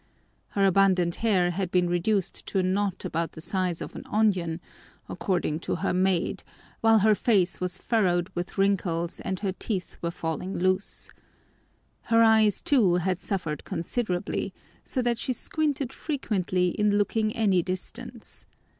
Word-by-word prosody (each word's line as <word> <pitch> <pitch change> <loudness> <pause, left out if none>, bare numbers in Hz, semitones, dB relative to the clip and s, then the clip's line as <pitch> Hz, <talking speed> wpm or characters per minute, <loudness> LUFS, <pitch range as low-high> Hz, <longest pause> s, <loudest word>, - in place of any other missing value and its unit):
Her 200 - +4
abundant 185 -3 +3
hair 190 -6 +2
had 185 +1 -2
been 180 0 +2
reduced 175 +3 -1
to - - -2
a 190 - +3
knot 195 +1 -1
about 165 +1 -2
the - - -10
size 180 0 -2
of - - -7
an - - -6
onion, 185 -6 +1 0.5
according 175 -4 -1
to - - -2
her 195 - -1
maid, 185 -1 +1 0.4
while 225 0 +5
her 215 +1 +5
face 190 - +2
was 180 0 -1
furrowed 185 -6 +1
with 175 +3 -5
wrinkles 180 -4 0
and 190 0 -4
her 195 -2 0
teeth 190 0 -4
were 170 - -1
falling 170 +2 -4
loose. 185 +2 -1 1.0
Her 230 0 +6
eyes, 220 -2 +4
too, 215 -11 +4
had 180 +1 0
suffered 165 -8 -3
considerably, 180 +1 -2 0.3
so 255 - -2
that 240 -1 +1
she 255 - -1
squinted 285 -2 -2
frequently 190 - -1
in 205 +2 +1
looking 215 +1 +1
any 200 -5 +3
distance. 215 +6 -7
190 Hz, 150 wpm, -27 LUFS, 175-215 Hz, 1.0 s, Her